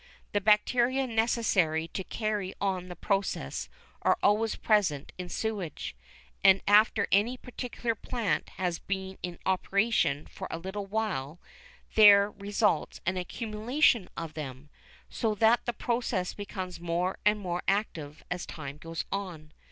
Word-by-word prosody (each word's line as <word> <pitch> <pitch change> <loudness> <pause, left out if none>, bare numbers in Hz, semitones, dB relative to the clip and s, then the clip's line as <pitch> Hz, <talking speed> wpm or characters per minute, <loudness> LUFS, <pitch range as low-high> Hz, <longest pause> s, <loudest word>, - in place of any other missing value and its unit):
The 205 - +1
bacteria 240 +6 +3
necessary 220 -9 +1
to 190 - -4
carry 210 -2 -2
on 190 -2 -1
the 180 - -7
process 185 - -2 0.3
are - - +3
always 215 +2 +3
present 190 -10 +1
in 180 -1 -5
sewage, 195 - -3 0.5
and 195 -1 +7
after 210 0 +5
any 220 +6 +3
particular 245 -2 -4
plant 225 0 -2
has 180 -2 -1
been 190 -1 -4
in 175 -1 -5
operation 190 -5 +1
for - - -8
a - - -3
little 190 +4 -5
while 190 -8 -2 0.5
there 205 -1 +8
results 200 -4 0
an 190 - +1
accumulation 220 - +1
of 165 -2 -5
them, 145 -1 -7 0.4
so 220 -2 -1
that 225 +4 +3
the - - +2
process 235 -6 -1
becomes 185 -3 -6
more 175 +2 -1
and 210 0 +3
more 180 -3 -3
active 165 -7 -1
as 180 0 -3
time 140 -2 -7
goes 165 +1 -5
on. 175 -6 -5
195 Hz, 135 wpm, -29 LUFS, 175-220 Hz, 0.5 s, there